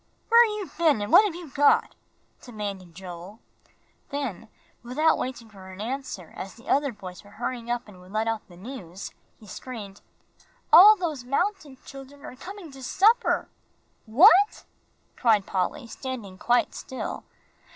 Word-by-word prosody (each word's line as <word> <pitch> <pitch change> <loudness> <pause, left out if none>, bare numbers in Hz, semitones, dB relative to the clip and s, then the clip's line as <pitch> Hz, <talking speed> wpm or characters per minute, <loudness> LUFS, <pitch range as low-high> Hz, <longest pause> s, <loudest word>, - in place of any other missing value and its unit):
"Where've 470 0 +7
you 415 -3 -6
been, 315 -8 +4
and 205 - -5
what've 410 -5 +6
you 340 -5 -9
got?" 290 +1 +3 0.5
demanded 200 -7 -7
Joel. 185 +3 -10 0.7
Then, 245 -7 -5 0.3
without 280 +7 +1
waiting 250 -3 -5
for 195 -3 -13
an 185 - -12
answer, 235 - -5
as 190 - -7
the 235 - -17
other 280 0 +2
boys 185 -5 -10
were 200 - -17
hurrying 240 0 -4
up 240 -1 -2
and 195 -3 -14
would 180 +1 -16
let 215 +2 -1
out 225 -1 -3
the 175 - -16
news, 195 -4 -8 0.3
he 220 - -16
screamed, 205 -1 -9 0.7
"All 420 +4 +10
those 315 -10 -4
mountain 295 +1 -2
children 275 +1 -12
are - - -9
coming 365 +2 -10
to 270 0 -12
supper!" 415 - +2 0.6
"What?" 370 - +5 0.5
cried 220 -5 +3
Polly, 200 +9 -2
standing 230 -6 -7
quite 245 0 +2
still. 260 - -6
245 Hz, 150 wpm, -26 LUFS, 205-295 Hz, 0.7 s, All